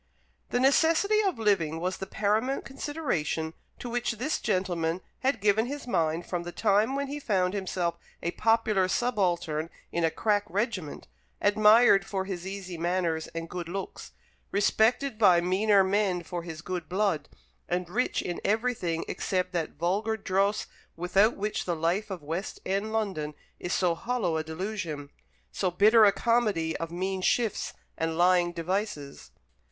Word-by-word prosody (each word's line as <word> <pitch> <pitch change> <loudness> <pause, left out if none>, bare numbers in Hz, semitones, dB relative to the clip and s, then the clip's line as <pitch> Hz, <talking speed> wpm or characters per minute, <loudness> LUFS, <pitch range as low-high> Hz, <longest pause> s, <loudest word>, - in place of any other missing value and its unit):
The 245 - +1
necessity 330 +10 +4
of 385 - 0
living 180 -8 +1
was 180 +2 -2
the 190 - -6
paramount 215 +7 0
consideration 260 - -2 0.2
to - - -7
which 240 0 -1
this 260 +8 -2
gentleman 180 -4 -1 0.2
had 265 -2 +1
given 210 +3 +2
his 285 +2 -5
mind 170 -6 0
from 175 -2 -3
the 175 0 -6
time 215 +6 +2
when 280 0 -1
he 285 +2 -5
found 190 -8 +1
himself 185 -3 -2 0.2
a 170 - 0
popular 220 -3 +2
subaltern 180 -8 0 0.2
in 170 - -1
a 165 - +4
crack 205 +4 +1
regiment, 200 -6 -3 0.3
admired 210 0 +6
for 195 -1 -3
his 190 -2 -5
easy 190 -3 -6
manners 170 -2 0
and 165 0 -4
good 175 -1 -6
looks, 195 +2 -6 0.4
respected 220 +4 +2
by 185 -5 +6
meaner 195 +3 +3
men 190 -2 +1
for 175 +1 -5
his 165 -2 -8
good 180 -3 -4
blood, 185 -6 0 0.4
and 180 0 -1
rich 230 +9 0
in 175 - -4
everything 210 -6 0
except 185 -1 -1
that 170 -4 -2
vulgar 200 +7 0
dross 200 +1 0 0.3
without 195 +6 +2
which 210 +1 -2
the 175 - -1
life 170 +7 0
of 185 -6 -6
West 165 +7 -4
end 200 +3 -1
London 190 -9 -2 0.2
is 175 - -4
so 180 -2 +2
hollow 230 -3 -1
a 160 - -1
delusion, 160 -3 -5 0.4
so 120 - 0
bitter 215 +5 +6
a 200 - +6
comedy 210 -9 +1
of 165 - -4
mean 185 +2 -2
shifts 225 +2 0 0.2
and 165 0 -2
lying 175 0 +4
devices. 175 -4 -3
190 Hz, 155 wpm, -28 LUFS, 170-220 Hz, 0.4 s, admired